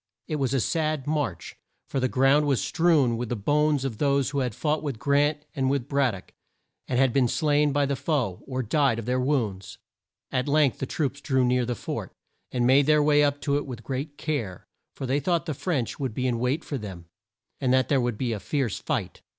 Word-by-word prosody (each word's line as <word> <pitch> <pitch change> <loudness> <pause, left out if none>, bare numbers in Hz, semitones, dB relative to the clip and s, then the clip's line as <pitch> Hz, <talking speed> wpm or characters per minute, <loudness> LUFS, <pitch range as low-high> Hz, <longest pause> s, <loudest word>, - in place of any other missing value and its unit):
It 155 - -2
was 135 -4 0
a - - +2
sad 155 0 -1
march, 150 -1 -2 0.3
for 135 - -2
the 130 - +1
ground 135 +4 +3
was 135 -4 +2
strewn 155 -9 +2
with 120 -1 -4
the 120 - -1
bones 145 +5 +1
of 115 -6 -4
those 140 -2 +2
who 140 - -1
had 125 -5 -2
fought 155 0 0
with 140 -6 -4
Grant 145 +4 +1
and 135 -2 +1
with 135 -2 -1
Brad 140 -6 +1
dock, 95 - -13 0.5
and 130 -1 +2
been 135 -3 +3
slain 150 +1 +2
by 145 +1 +2
the 140 0 -1
foe, 130 - -1
or 130 -1 -2
died 135 +1 +2
of 115 - -5
their 125 +1 0
wounds. 120 -8 -1 0.5
At 130 +1 0
length 145 -2 +2
the 135 - -3
troops 140 -2 -2
drew 130 -3 +2
near 125 -1 +1
the 125 - -1
fort, - - -5 0.4
and 120 -1 0
made 135 +3 +5
their 150 -1 +5
way 150 0 +4
up 145 0 +1
to 140 -1 +1
it 145 - -4
with 120 -3 -7
great 140 +4 -4
care, 115 - -3 0.3
for 135 - -5
they 135 +3 +1
thought 170 +4 0
the 155 - -2
French 140 -5 -2
would 130 -6 -3
be 130 - -1
in 120 -2 0
wait 130 +6 0
for 140 - -4
them, 95 -5 -8 0.5
and 130 - +1
that 130 0 +3
there 140 -3 +2
would 120 -3 -1
be 120 -1 -1
a 105 - -3
fierce 130 0 -2
fight. - - -3
135 Hz, 225 wpm, -26 LUFS, 125-145 Hz, 0.5 s, made